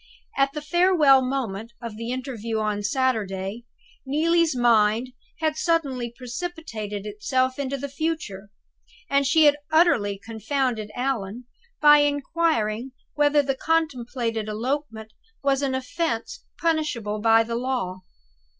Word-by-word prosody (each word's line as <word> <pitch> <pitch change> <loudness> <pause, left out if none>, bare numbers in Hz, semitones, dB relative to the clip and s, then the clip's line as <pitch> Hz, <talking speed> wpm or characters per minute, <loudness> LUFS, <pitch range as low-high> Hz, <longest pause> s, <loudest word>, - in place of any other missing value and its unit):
At 275 0 +2
the 300 - -5
farewell 325 -5 +5
moment 235 -4 -3
of 230 -3 -7
the 230 +2 -5
interview 245 -4 -4
on 210 -1 -1
Saturday, 210 -2 -1 0.4
Neelie's 320 +2 +2
mind 230 0 +3 0.3
had 310 -1 +1
suddenly 275 -9 0
precipitated 240 - -5
itself 255 +5 -1
into 275 0 -2
the 280 +1 -4
future; 280 -10 -4 0.6
and 280 0 +3
she 315 +2 +5
had 290 0 +5
utterly 275 - +3
confounded 225 +2 -2
Allan 245 -3 -3 0.4
by 295 0 +8
inquiring 285 -5 0 0.2
whether 295 0 +3
the 275 0 0
contemplated 245 -8 -1
elopement 225 -1 -3 0.3
was 275 0 +2
an 270 -2 0
offense 330 - -3
punishable 300 -11 -1
by 225 0 +5
the 230 +1 -4
Law? 235 -7 -2
255 Hz, 120 wpm, -24 LUFS, 220-290 Hz, 0.6 s, by